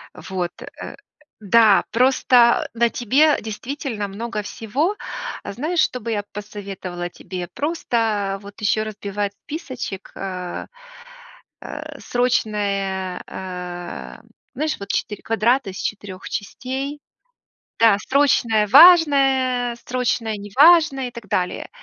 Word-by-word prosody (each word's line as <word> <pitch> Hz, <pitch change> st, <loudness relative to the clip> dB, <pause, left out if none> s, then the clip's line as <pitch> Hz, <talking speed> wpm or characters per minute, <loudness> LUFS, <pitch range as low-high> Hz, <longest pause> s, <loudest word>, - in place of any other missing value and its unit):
Вот, 180 Hz, -2 st, -4 dB
э, -, -, -9 dB, 0.4 s
да, 215 Hz, 0 st, +5 dB
просто 245 Hz, -1 st, +4 dB
на 235 Hz, 0 st, +2 dB
тебе 280 Hz, +7 st, +3 dB
действительно 225 Hz, -1 st, -4 dB
много 215 Hz, +2 st, -4 dB
всего. 270 Hz, -, -2 dB, 0.5 s
Знаешь, 310 Hz, -, -2 dB
что 250 Hz, -, +2 dB
бы 230 Hz, +1 st, -4 dB
я 205 Hz, -2 st, -1 dB
посоветовала 195 Hz, -4 st, -6 dB
тебе? 180 Hz, 0 st, -7 dB
Просто 225 Hz, -10 st, -1 dB
вот 200 Hz, 0 st, -12 dB
еще 215 Hz, +1 st, +2 dB
разбивать 205 Hz, -1 st, -4 dB
списочек, 260 Hz, -, -6 dB
а, 180 Hz, -2 st, -5 dB, 1.3 s
срочные, 200 Hz, -6 st, -1 dB
а 180 Hz, -1 st, -7 dB, 0.3 s
Знаешь, 310 Hz, +3 st, -1 dB
вот 200 Hz, -, -8 dB
4 210 Hz, 0 st, -2 dB
квадрата 225 Hz, +1 st, +1 dB
из 185 Hz, -, -9 dB
4 200 Hz, -3 st, -5 dB
частей? 265 Hz, +7 st, -4 dB, 0.8 s
Да, 225 Hz, -3 st, +6 dB
срочное-важное, 265 Hz, -, +5 dB
срочное-неважное, 250 Hz, -, +3 dB
и -, -, -10 dB
так 235 Hz, -4 st, -10 dB
далее. 180 Hz, -1 st, -1 dB
220 Hz, 100 wpm, -21 LUFS, 200-260 Hz, 1.3 s, Да